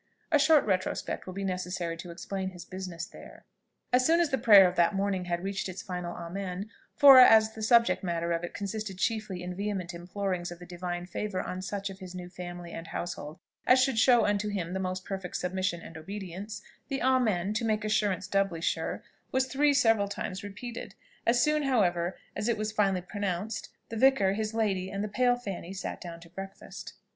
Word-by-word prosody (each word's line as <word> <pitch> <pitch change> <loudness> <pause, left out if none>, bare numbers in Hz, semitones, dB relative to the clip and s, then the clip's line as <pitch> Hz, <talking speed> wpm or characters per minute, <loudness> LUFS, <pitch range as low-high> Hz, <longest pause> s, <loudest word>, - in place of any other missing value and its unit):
A 300 - +5
short 300 +1 +5
retrospect 185 -2 -1
will 185 - -5
be 195 - -3
necessary 180 -2 -2
to 175 - -8
explain 190 +2 -4
his 175 -2 -10
business 180 -2 -6
there. - - -14 0.5
As 250 0 +5
soon 330 +5 +4
as 335 -4 +2
the 265 - +2
prayer 205 -5 +8
of 180 - -3
that 175 +3 +3
morning 195 -2 0
had 175 0 -2
reached 195 0 -2
its 185 0 -6
final 180 -2 -5
Amen 185 +4 -5 0.2
for 275 -2 +10
as 220 -3 +7
the 220 - -8
subject 235 0 +4
matter 170 -1 -1
of 165 0 0
it 175 - -4
consisted 205 -1 -4
chiefly 210 -3 -1
in 180 0 -4
vehement 195 -3 -3
implorings 180 0 -3
of 175 - -7
the 175 - -11
divine 175 0 -4
favour 190 +1 -3
on 185 0 -4
such 200 +1 -4
of 190 - -11
his 185 -1 -9
new 180 -1 -7
family 175 -1 -8
and 165 0 -7
household 160 -3 -5 0.3
as 255 - +7
should 255 -4 +1
show 245 -1 +5
unto 205 0 +1
him 180 -4 -3
the 190 - -1
most 185 0 -3
perfect 190 -2 -5
submission 180 -2 -1
and 165 - -11
obedience, 195 +4 -7 0.2
the 275 -2 -2
Amen, 215 -7 +2
to 220 - -1
make 215 -1 0
assurance 210 -4 +1
doubly 195 -3 0
sure, 165 - -2 0.3
was 260 0 +2
three 290 +3 +2
several 225 -7 +3
times 195 -1 -4
repeated; 230 +4 -7 0.3
as 240 +1 +4
soon, 300 0 +2
however, 185 -10 +1 0.2
as 210 +3 -1
it 230 - +1
was 215 0 -2
finally 195 -4 +1
pronounced, 200 +2 -3 0.2
the 225 - -5
vicar, 220 -6 +4
his 215 +1 -3
lady, 195 -4 0
and 200 +1 -3
the - - -1
pale 245 +4 +2
Fanny, 195 -6 -6
sat 195 - -5
down 170 -2 -7
to 165 - -13
breakfast. 195 +2 -8
195 Hz, 200 wpm, -29 LUFS, 180-220 Hz, 0.5 s, for